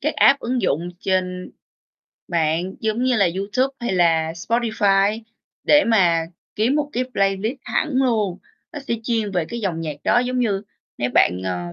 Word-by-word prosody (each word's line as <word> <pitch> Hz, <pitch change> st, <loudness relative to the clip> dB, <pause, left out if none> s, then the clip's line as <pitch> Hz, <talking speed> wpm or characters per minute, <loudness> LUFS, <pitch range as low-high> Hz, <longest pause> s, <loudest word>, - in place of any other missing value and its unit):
các -, -, -1 dB
app, 280 Hz, -, +5 dB
ứng 245 Hz, -1 st, -2 dB
dụng 170 Hz, +1 st, 0 dB
trên 185 Hz, -1 st, -2 dB, 0.8 s
mạng 170 Hz, +2 st, 0 dB
giống 220 Hz, +3 st, -1 dB
như 255 Hz, -1 st, +2 dB
là 195 Hz, -4 st, +3 dB
YouTube 230 Hz, +8 st, 0 dB
hay 240 Hz, -4 st, -2 dB
là 165 Hz, -3 st, +2 dB
Spotify 210 Hz, +1 st, +1 dB, 0.4 s
để 295 Hz, 0 st, +5 dB
mà 175 Hz, -7 st, +3 dB, 0.3 s
kiếm 230 Hz, +6 st, +1 dB
một 295 Hz, -1 st, -1 dB
cái 250 Hz, -, 0 dB
playlist 195 Hz, +6 st, 0 dB
hẳn 310 Hz, -, -1 dB
luôn. 225 Hz, -8 st, +1 dB, 0.4 s
Nó 295 Hz, -, -5 dB
sẽ 275 Hz, -4 st, -3 dB
chuyên 225 Hz, -3 st, -1 dB
về 175 Hz, -3 st, 0 dB
cái 235 Hz, +6 st, -6 dB
dòng 175 Hz, -6 st, -2 dB
nhạc 155 Hz, -3 st, -4 dB
đó 240 Hz, -, +3 dB
giống 250 Hz, 0 st, -1 dB
như 205 Hz, -5 st, 0 dB, 0.4 s
nếu 120 Hz, +1 st, -1 dB
bạn, 90 Hz, +1 st, +3 dB
ờ 90 Hz, -1 st, -2 dB
200 Hz, 175 wpm, -21 LUFS, 175-240 Hz, 0.8 s, app